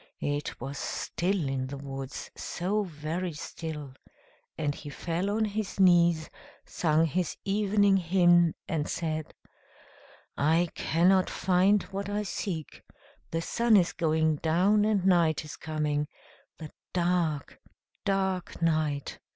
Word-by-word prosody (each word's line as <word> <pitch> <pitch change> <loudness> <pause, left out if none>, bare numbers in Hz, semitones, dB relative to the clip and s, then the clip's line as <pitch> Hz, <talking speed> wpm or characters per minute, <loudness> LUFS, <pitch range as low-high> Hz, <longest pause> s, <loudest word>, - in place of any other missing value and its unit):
It 145 0 -3
was 135 +3 -5
still 180 -3 -1
in 130 -1 -2
the 140 +1 -6
woods, 135 0 -7
so 195 +5 -2
very 165 0 -4
still; 150 -2 -6 0.6
and 145 -2 0
he 145 - -9
fell 170 +7 -2
on 220 +2 +1
his 210 -1 -4
knees, 170 -3 +5 0.4
sung 160 -1 +2
his 175 +2 -1
evening 205 0 +3
hymn, 175 -2 +4
and 155 -3 -2
said: 155 -2 -3 1.0
"I 165 +4 +2
cannot 185 +3 +3
find 190 +2 +3
what 195 +1 -4
I 205 +1 -1
seek; 180 -5 -5 0.5
the 165 0 -2
sun 235 +1 +3
is 175 -3 +2
going 160 -1 +1
down, 185 +7 +3
and 205 -4 +1
night 170 -5 +3
is 150 - -8
coming 150 -2 -2 0.5
the 155 -2 -9 0.2
dark, 170 -4 0 0.4
dark 190 -3 -1
night. 155 -4 0
170 Hz, 125 wpm, -28 LUFS, 155-190 Hz, 1.0 s, knees